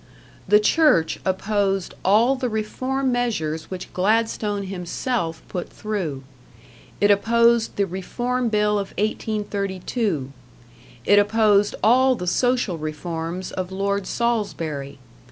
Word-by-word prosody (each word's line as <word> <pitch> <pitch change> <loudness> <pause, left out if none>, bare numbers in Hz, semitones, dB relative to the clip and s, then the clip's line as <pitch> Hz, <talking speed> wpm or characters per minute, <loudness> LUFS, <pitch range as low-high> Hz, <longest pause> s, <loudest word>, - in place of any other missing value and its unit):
The 210 +2 +6
Church 215 - +3
opposed 195 0 0
all 225 +7 +4
the 255 -2 -2
reform 255 +5 -1
measures 185 -11 -2
which 185 -1 -7
Gladstone 210 +1 0
himself 185 -1 -3
put 180 - -5
through. 180 -11 -4 0.8
It 205 0 +4
opposed 235 +2 +3
the 200 - +1
Reform 240 +7 -2
Bill 210 -1 +2
of 195 - -5
1832. 200 - -2 0.7
It 205 0 +6
opposed 205 -1 +3
all 255 +4 +5
the 180 - -5
social 245 -3 +1
reforms 165 +3 -4
of 185 0 -4
Lord 200 0 -1
Salisbury. 165 - -2
205 Hz, 110 wpm, -23 LUFS, 185-230 Hz, 0.8 s, The